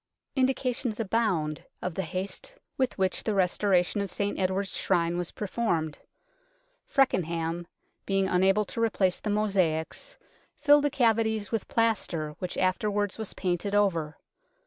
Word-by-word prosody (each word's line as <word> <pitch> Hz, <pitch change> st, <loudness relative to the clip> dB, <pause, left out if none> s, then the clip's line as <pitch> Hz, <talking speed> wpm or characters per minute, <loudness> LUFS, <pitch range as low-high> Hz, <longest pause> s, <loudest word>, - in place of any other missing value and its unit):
Indications 255 Hz, -3 st, 0 dB
abound 190 Hz, -9 st, 0 dB, 0.2 s
of 180 Hz, -, -3 dB
the 190 Hz, -, -2 dB
haste 190 Hz, -, -5 dB, 0.2 s
with 260 Hz, -2 st, 0 dB
which 190 Hz, -1 st, 0 dB
the 215 Hz, -, 0 dB
restoration 190 Hz, +1 st, +2 dB
of 200 Hz, -, -3 dB
St 200 Hz, +3 st, -2 dB
Edward's 190 Hz, +1 st, 0 dB
Shrine 170 Hz, -2 st, +1 dB
was 175 Hz, -1 st, -2 dB
per 210 Hz, -, -5 dB
formed. 170 Hz, -8 st, -1 dB, 0.9 s
Feckenham, 170 Hz, -, +1 dB, 0.4 s
being 195 Hz, -1 st, +2 dB
unable 190 Hz, +3 st, +3 dB
to 230 Hz, -, -4 dB
replace 190 Hz, -5 st, +2 dB
the 215 Hz, -, -4 dB
mosaics, 195 Hz, -, 0 dB, 0.4 s
filled 290 Hz, -1 st, +5 dB
the -, -, +3 dB
cavities 225 Hz, -5 st, +1 dB
with 225 Hz, -3 st, -2 dB
plaster, 205 Hz, -9 st, 0 dB
which 180 Hz, -1 st, -4 dB
afterwards 205 Hz, +2 st, 0 dB
was 220 Hz, -, -5 dB
painted 185 Hz, +2 st, -1 dB
over. 170 Hz, -7 st, +1 dB
195 Hz, 135 wpm, -28 LUFS, 180-220 Hz, 0.9 s, filled